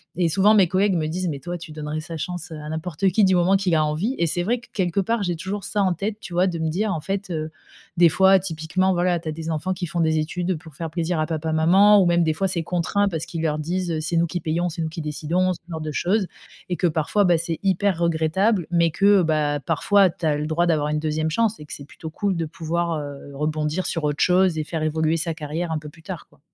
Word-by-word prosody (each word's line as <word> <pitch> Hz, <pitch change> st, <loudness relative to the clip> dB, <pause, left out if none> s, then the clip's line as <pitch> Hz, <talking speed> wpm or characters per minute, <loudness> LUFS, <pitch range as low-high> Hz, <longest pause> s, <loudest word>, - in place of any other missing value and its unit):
et 175 Hz, -1 st, +2 dB
souvent 195 Hz, +6 st, +4 dB
mes 195 Hz, -4 st, +5 dB
collègues 190 Hz, +2 st, +2 dB
me 155 Hz, -2 st, 0 dB
disent: 180 Hz, +3 st, -2 dB
«Mais 145 Hz, -3 st, -4 dB
toi, 175 Hz, +5 st, -5 dB
tu 165 Hz, -1 st, -10 dB
donnerais 150 Hz, 0 st, -4 dB
sa 165 Hz, 0 st, -7 dB
chance 175 Hz, +3 st, -5 dB
à 150 Hz, -1 st, -7 dB
n'importe 160 Hz, +3 st, -2 dB
qui, 200 Hz, +3 st, +2 dB
du 185 Hz, -1 st, +3 dB
moment 180 Hz, +2 st, +3 dB
qu'il 190 Hz, -4 st, +1 dB
a 155 Hz, -1 st, +3 dB
envie», 170 Hz, -, -1 dB
et 170 Hz, -, +1 dB
c'est 175 Hz, +3 st, -1 dB
vrai 240 Hz, +6 st, 0 dB
que, 230 Hz, -, -18 dB
quelque 185 Hz, -1 st, 0 dB
part, 225 Hz, +2 st, -1 dB
j'ai 175 Hz, -2 st, -1 dB
toujours 190 Hz, +4 st, -5 dB
ça 205 Hz, -1 st, 0 dB
en 185 Hz, -2 st, +2 dB
tête, 205 Hz, +5 st, -4 dB
tu 180 Hz, -, -9 dB
vois, 180 Hz, +2 st, +3 dB
de 170 Hz, -2 st, -3 dB
me 160 Hz, 0 st, 0 dB
dire, 200 Hz, +5 st, 0 dB
en 160 Hz, -, -2 dB
fait, 195 Hz, +3 st, -3 dB
heu, 155 Hz, -1 st, -3 dB, 0.5 s
des 170 Hz, -1 st, +7 dB
fois, 190 Hz, +4 st, +5 dB
typiquement, 185 Hz, +2 st, -1 dB
voilà, 175 Hz, 0 st, +1 dB
tu 165 Hz, -1 st, -6 dB
as -, -, -1 dB
des 165 Hz, +1 st, -6 dB
enfants 160 Hz, +4 st, -1 dB
qui 180 Hz, -1 st, -4 dB
font 170 Hz, +1 st, -4 dB
des 160 Hz, -1 st, +2 dB
études 175 Hz, +3 st, -2 dB
pour 160 Hz, -1 st, -14 dB
faire 165 Hz, +2 st, -4 dB
plaisir 165 Hz, +1 st, -2 dB
à 155 Hz, -, +1 dB
papa 160 Hz, -1 st, -2 dB
maman 195 Hz, +6 st, +6 dB
ou -, -, +3 dB
même, 175 Hz, 0 st, +3 dB
des 160 Hz, -, +1 dB
fois, 195 Hz, +5 st, 0 dB
c'est 175 Hz, -3 st, -2 dB
contraint 180 Hz, +4 st, 0 dB
parce 165 Hz, -3 st, -4 dB
qu'ils 165 Hz, -, -5 dB
leur 155 Hz, -1 st, 0 dB
disent 175 Hz, +3 st, -2 dB
heu,: 160 Hz, -, -1 dB
«C'est 160 Hz, +2 st, -1 dB
nous 170 Hz, +1 st, +3 dB
qui 175 Hz, +2 st, -3 dB
payons, 170 Hz, +2 st, -1 dB
c'est 165 Hz, -, -5 dB
nous 160 Hz, -, -2 dB
qui 165 Hz, +1 st, -6 dB
décidons», 165 Hz, +5 st, 0 dB
ce -, -, -11 dB
genre 160 Hz, -2 st, -5 dB
de 155 Hz, 0 st, -4 dB
choses 190 Hz, +6 st, 0 dB, 0.4 s
et 180 Hz, -, -1 dB
que 180 Hz, -, +2 dB
parfois, 160 Hz, +6 st, +1 dB
bah, 175 Hz, -2 st, +4 dB
c'est 165 Hz, 0 st, -3 dB
hyper 195 Hz, -1 st, +1 dB
regrettable, 170 Hz, +4 st, +1 dB
mais 170 Hz, -1 st, +3 dB
que, 200 Hz, +3 st, +4 dB
bah, 150 Hz, -2 st, +1 dB
parfois 200 Hz, -2 st, +3 dB
tu 165 Hz, 0 st, -6 dB
as 150 Hz, -2 st, +2 dB
le 150 Hz, +1 st, -3 dB
droit 170 Hz, +2 st, +1 dB
d'avoir 150 Hz, -3 st, +1 dB
une 150 Hz, 0 st, 0 dB
2e 155 Hz, 0 st, -1 dB
chance 225 Hz, +4 st, +1 dB
et 150 Hz, -, -9 dB
que -, -, -9 dB
c'est 140 Hz, -, -8 dB
plutôt 160 Hz, +1 st, -9 dB
cool 195 Hz, +4 st, -1 dB
de 165 Hz, -, -1 dB
pouvoir, 165 Hz, 0 st, -2 dB
heu, 145 Hz, -1 st, -8 dB
rebondir 155 Hz, +4 st, -1 dB
sur 165 Hz, -, -2 dB
autre 145 Hz, 0 st, +1 dB
chose 180 Hz, -2 st, +3 dB
et 155 Hz, -, 0 dB
faire 160 Hz, +1 st, -4 dB
évoluer 160 Hz, +1 st, +1 dB
sa 165 Hz, +1 st, -1 dB
carrière 160 Hz, +2 st, -4 dB
un 160 Hz, -, -1 dB
peu 150 Hz, 0 st, -9 dB
plus 160 Hz, +1 st, -19 dB
tard, 180 Hz, -2 st, -7 dB
quoi. -, -, -26 dB
170 Hz, 275 wpm, -23 LUFS, 155-185 Hz, 0.5 s, des